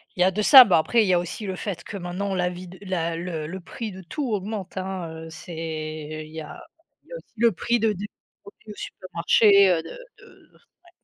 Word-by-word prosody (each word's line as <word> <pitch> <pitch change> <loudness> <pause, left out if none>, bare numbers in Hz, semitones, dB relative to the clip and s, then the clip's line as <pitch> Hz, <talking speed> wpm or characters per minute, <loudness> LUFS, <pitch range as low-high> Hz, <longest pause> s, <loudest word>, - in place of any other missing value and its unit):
il 180 - -2
y - - +7
a 185 - +4
de 210 - -2
ça 260 +4 +11
bah 190 -8 +3
après 225 +8 +2
il - - -1
y 185 - +3
a 175 - +4
aussi 175 +5 -5
le 190 -1 -3
fait 180 -3 -5
que 205 - -7
maintenant 190 +2 -4
la 180 -1 0
vie 180 +1 -9
de 180 +2 -12
la 170 -4 -2
le 165 -2 -4
le 180 +5 -6
prix 215 +4 -7
de 190 0 -10
tout 260 - -4
augmente 200 -2 -4
hein, 185 -2 -4 0.2
heu, - - -10
c'est 155 -2 -6
il 155 - -15
y 160 - -5
a 150 - -10 0.4
il - - -27
y - - -10
a - - -4
aussi - - -17
le 230 +1 +4
prix 235 +5 0
de 220 -1 +2
des 205 +2 -6 0.3
produits 400 - -14
au - - -10
supermarché, 200 +2 +3
heu, 170 -3 +2
de - - -10
de - - -15 0.3
ouais. - - -19
185 Hz, 250 wpm, -24 LUFS, 170-210 Hz, 0.4 s, ça